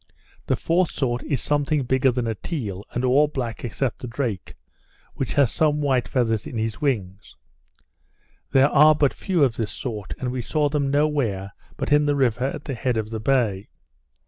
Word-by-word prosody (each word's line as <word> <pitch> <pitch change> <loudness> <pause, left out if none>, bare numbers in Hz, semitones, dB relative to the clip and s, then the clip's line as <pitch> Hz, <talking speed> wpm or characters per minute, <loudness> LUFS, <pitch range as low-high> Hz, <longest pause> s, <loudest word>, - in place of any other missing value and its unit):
The - - +2
fourth 175 +1 +1
sort 120 -3 -1
is 140 -5 -2
something 145 0 +1
bigger 130 +1 +2
than 125 -1 -2
a 115 - -1
teal, 105 - -5
and 125 +1 -1
all 140 +4 +4
black 125 -6 -4
except 120 +1 -2
the 125 - -6
drake, 115 -5 -4 0.6
which 130 -3 -3
has 140 -5 +4
some 150 -1 +2
white 135 -4 +1
feathers 115 -5 0
in 120 - -6
his 110 +5 -3
wing. 100 -10 -1 1.3
There 135 +1 +5
are 150 +1 +6
but 145 -2 +2
few 180 -6 0
of 125 -5 +1
this 110 -4 -2
sort, 110 -5 -5
and 125 -1 -3
we 125 -1 -3
saw 145 +5 0
them 140 -1 0
no 145 +2 +3
where 105 -10 -2 0.3
but - - -3
in 150 0 +4
the 145 - +2
river 125 -2 +1
at 140 +2 -4
the 140 - -4
head 125 -1 -1
of 110 0 -3
the 110 - -3
bay. 110 -5 0
130 Hz, 195 wpm, -23 LUFS, 115-145 Hz, 1.3 s, are